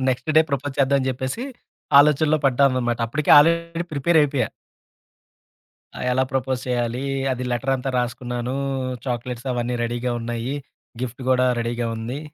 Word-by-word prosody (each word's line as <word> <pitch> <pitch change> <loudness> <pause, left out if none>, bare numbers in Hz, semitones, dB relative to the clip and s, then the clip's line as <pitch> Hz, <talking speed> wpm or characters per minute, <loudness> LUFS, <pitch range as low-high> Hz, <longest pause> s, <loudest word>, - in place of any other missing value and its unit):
Next 130 +4 -1
day - - +9
propose 140 0 -2
చేద్దాం 140 0 +3
అని 130 - -2
జెప్పేసి 130 - -3 0.5
ఆలోచనలో 150 +1 +4
పడ్డాననమాట. 130 -3 +2
అప్పటికే 150 +6 -1
ఆల్రెడీ 170 +2 +2
ప్రిపేర్ 155 +3 +2
అయిపోయా. 140 -6 +1 1.5
ఆ! - - -7
ఎలా 130 +1 +2
ప్రపోజ్ 130 -1 -1
చేయాలి? 120 0 -1 0.3
అది 125 0 -3
లెటరంతా 135 +2 -1
రాసుకున్నాను, 120 0 -3 0.5
చాక్లెట్సవన్నీ 125 0 -3
రెడీగా 120 +1 -2
ఉన్నయి. 120 +2 -3 0.5
గిఫ్ట్ 125 0 -5
గూడా 130 0 +4
రెడీగా 120 0 -2
ఉంది. 115 +5 -5
130 Hz, 125 wpm, -22 LUFS, 120-140 Hz, 1.5 s, day